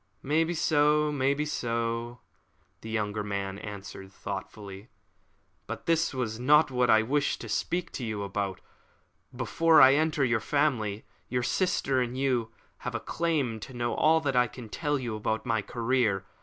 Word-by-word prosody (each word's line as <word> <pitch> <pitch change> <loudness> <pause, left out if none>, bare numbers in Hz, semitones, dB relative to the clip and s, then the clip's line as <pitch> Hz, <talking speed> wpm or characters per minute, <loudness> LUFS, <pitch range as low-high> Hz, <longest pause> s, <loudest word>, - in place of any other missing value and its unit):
"Maybe 160 +4 +1
so, 150 -1 +3
maybe 140 +1 +1
so," 115 -3 -2 0.6
the 110 - -8
younger 105 -1 -2
man 100 -1 -3
answered 95 -2 -8
thoughtfully. 100 +2 -7 0.8
"But - - -6
this 165 0 +2
was 120 -5 -3
not 150 +3 +4
what 125 -1 +1
I 110 0 +6
wished 145 +5 0
to 115 - -7
speak 175 +11 -2
to 130 - -5
you 110 -3 -3
about. 100 -1 -3 0.7
Before 160 +6 +3
I 135 -1 +8
enter 150 -1 +2
your 120 -2 +2
family, 115 -8 0 0.2
your 125 0 -1
sister 135 -6 +1
and 125 +1 -3
you 125 -4 0 0.3
have - - -5
a - - 0
claim 150 -9 -1
to 125 +4 -9
know 120 0 -1
all 160 +1 +4
that 140 -3 -1
I 125 0 +4
can 115 0 -10
tell 145 +4 -1
you 120 -4 -4
about 110 +2 -2
my 115 -2 +1
career. 115 -4 0
125 Hz, 160 wpm, -28 LUFS, 110-145 Hz, 0.8 s, I